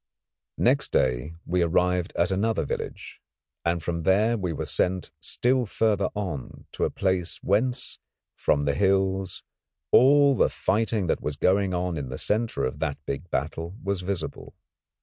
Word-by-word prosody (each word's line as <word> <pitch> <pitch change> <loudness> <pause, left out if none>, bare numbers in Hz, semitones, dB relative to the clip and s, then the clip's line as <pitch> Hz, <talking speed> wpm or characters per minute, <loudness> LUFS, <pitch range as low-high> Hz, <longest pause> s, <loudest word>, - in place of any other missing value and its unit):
Next - - +2
day 65 +7 +1
we 90 +1 +1
arrived 90 +1 +1
at 85 +2 +1
another 100 -2 0
village, - - -6 0.4
and 85 -1 0
from 85 0 -2
there 105 +7 +3
we 95 -6 -2
were 75 - -3
sent 90 0 0
still 125 +7 +1
further 105 -1 +1
on, 90 -11 -5
to - - -1
a - - 0
place 95 -2 -1
whence, 120 +6 0 0.4
from 70 0 +1
the 70 - +2
hills, 95 0 +1 0.5
all 140 +2 +6
the - - +3
fighting 110 -2 0
that 85 - 0
was 75 -1 -3
going 95 +4 +2
on 90 -1 -1
in 70 -3 -4
the 65 - -5
centre 110 +2 0
of 65 +3 -4
that 75 -3 -1
big 70 +6 -5
battle 80 +5 -3
was 100 -1 -1
visible. 90 -3 -4
90 Hz, 155 wpm, -26 LUFS, 80-100 Hz, 0.5 s, all